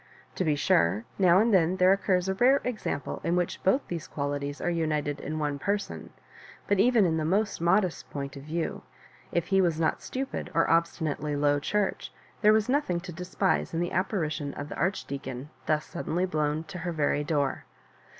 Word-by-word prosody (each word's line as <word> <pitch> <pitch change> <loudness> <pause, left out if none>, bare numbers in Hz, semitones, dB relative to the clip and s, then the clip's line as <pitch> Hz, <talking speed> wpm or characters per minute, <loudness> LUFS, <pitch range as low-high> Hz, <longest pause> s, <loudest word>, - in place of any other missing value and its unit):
To - - -1
be 155 -4 +2
sure, 100 - +2
now 180 -2 +6
and 220 +2 +3
then 180 -1 +4
there 185 +1 +6
occurs 190 -2 +1
a 190 - +1
rare 255 +7 +4
example 220 -11 -3
in 170 +2 +1
which 175 -1 -1
both 255 +9 +2
these 170 -3 -5
qualities 145 0 -3
are - - -3
united 150 -3 -1
in 155 +2 -4
one 145 -2 -2
person; 200 +5 -3 0.6
but 200 -1 +1
even 230 -1 +5
in 160 -2 +1
the 155 - -1
most 195 +4 0
mo 175 +4 +5
dest 185 -4 -5
point 140 -1 -5
of 140 - -8
view, 160 +3 -3 0.5
if 170 - 0
he 195 -1 +4
was 170 -3 +1
not 160 - +1
stupid 265 +1 -4
or 165 - +4
obsti 170 +1 +1
nately 150 -1 -2
Low 145 0 +2
Church, 205 +6 -1 0.3
there 210 -1 +6
was 215 -1 +3
nothing 255 -10 +1
to 180 0 -8
despise 180 +1 -1
in - - 0
the 175 0 -1
apparition 155 -6 -1
of 145 +1 -6
the - - -6
Archdeacon 140 -6 -3 0.2
thus 155 -1 +1
sudden 170 -2 -5
ly 180 +1 +2
blown 155 -3 -1
to 180 +3 -8
her 175 +1 -3
very 150 -2 +1
door. 145 -2 -1
170 Hz, 200 wpm, -28 LUFS, 150-190 Hz, 0.6 s, now